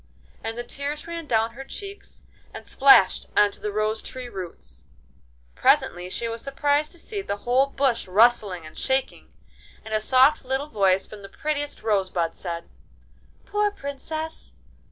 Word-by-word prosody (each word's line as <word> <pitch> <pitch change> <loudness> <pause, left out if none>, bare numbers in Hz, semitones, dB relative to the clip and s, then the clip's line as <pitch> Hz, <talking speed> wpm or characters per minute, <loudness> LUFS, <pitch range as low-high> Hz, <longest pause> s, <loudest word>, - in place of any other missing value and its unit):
And 225 +1 -4
the 240 - -3
tears 285 +4 -4
ran 335 -2 -6
down 225 -2 +2
her 255 +4 -9
cheeks 400 +8 -9 0.3
and - - -9
splashed 270 -9 +5
on 205 -1 +6
to - - -7
the 210 - -2
rose 215 +1 0
tree 255 -1 -7
roots. 170 - -9 0.7
Presently 180 - +2
she 230 +5 -3
was 230 0 -5
surprised 285 +2 0
to - - -15
see 405 +3 -5
the 205 - -3
whole 255 +3 +4
bush 270 -6 0
rustling 200 -4 +3
and 155 - -12
shaking, 265 0 -2 0.5
and 220 - -6
a 215 - +1
soft 265 +6 +5
little 265 +2 -1
voice 195 -4 +2
from 210 - -11
the 195 - -10
prettiest 290 0 -3
rosebud 190 -6 0
said: 170 -2 -5 0.8
'Poor 415 0 +1
Princess! 315 -1 -6
240 Hz, 155 wpm, -25 LUFS, 200-285 Hz, 0.8 s, on